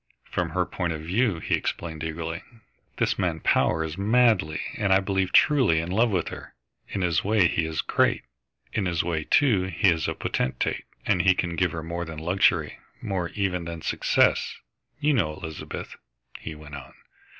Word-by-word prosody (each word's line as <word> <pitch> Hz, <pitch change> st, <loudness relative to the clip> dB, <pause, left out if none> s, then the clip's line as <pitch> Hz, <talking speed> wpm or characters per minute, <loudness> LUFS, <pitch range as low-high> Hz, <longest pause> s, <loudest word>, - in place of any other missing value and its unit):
"From -, -, -1 dB
her -, -, 0 dB
point 85 Hz, -3 st, -2 dB
of 80 Hz, -, -6 dB
view," 95 Hz, +4 st, +1 dB
he -, -, -3 dB
explained 80 Hz, -2 st, -2 dB
eagerly. 80 Hz, +2 st, -4 dB, 0.6 s
"This -, -, 0 dB
man -, -, 0 dB
Power 80 Hz, +1 st, +2 dB
is 80 Hz, +3 st, -5 dB
madly 105 Hz, -7 st, +3 dB, 0.2 s
and 100 Hz, -2 st, 0 dB
I 95 Hz, -, +6 dB
believe 95 Hz, -1 st, -1 dB
truly 130 Hz, -, +4 dB
in 85 Hz, +2 st, -4 dB
love 115 Hz, +5 st, +3 dB
with 95 Hz, -4 st, -1 dB
her. -, -, -10 dB, 0.3 s
In 100 Hz, -, -3 dB
his 85 Hz, -3 st, +1 dB
way 105 Hz, -3 st, +4 dB
he 80 Hz, -1 st, 0 dB
is 80 Hz, -1 st, -2 dB
great; -, -, +2 dB, 0.5 s
in 100 Hz, -4 st, 0 dB
his 85 Hz, -2 st, 0 dB
way, 80 Hz, -3 st, -2 dB
too, 110 Hz, -10 st, +3 dB
he 95 Hz, +2 st, +2 dB
is 80 Hz, -2 st, +1 dB
a -, -, -2 dB
potentate. 65 Hz, -, -2 dB, 0.2 s
He 95 Hz, +1 st, +3 dB
can 85 Hz, -2 st, -2 dB
give 90 Hz, 0 st, +1 dB
her 80 Hz, 0 st, -5 dB
more 85 Hz, +1 st, -4 dB
than 80 Hz, -1 st, -8 dB
luxury, 90 Hz, +5 st, +1 dB, 0.2 s
more, 90 Hz, -4 st, -2 dB
even, 90 Hz, -4 st, -1 dB
than 85 Hz, -1 st, -6 dB
success. -, -, +2 dB, 0.4 s
You 150 Hz, 0 st, +2 dB
know 80 Hz, -, +1 dB
Elizabeth," 80 Hz, -1 st, -7 dB, 0.4 s
he 80 Hz, -, -7 dB
went 75 Hz, -1 st, -12 dB
on. 70 Hz, -2 st, -9 dB
85 Hz, 180 wpm, -26 LUFS, 80-95 Hz, 0.6 s, I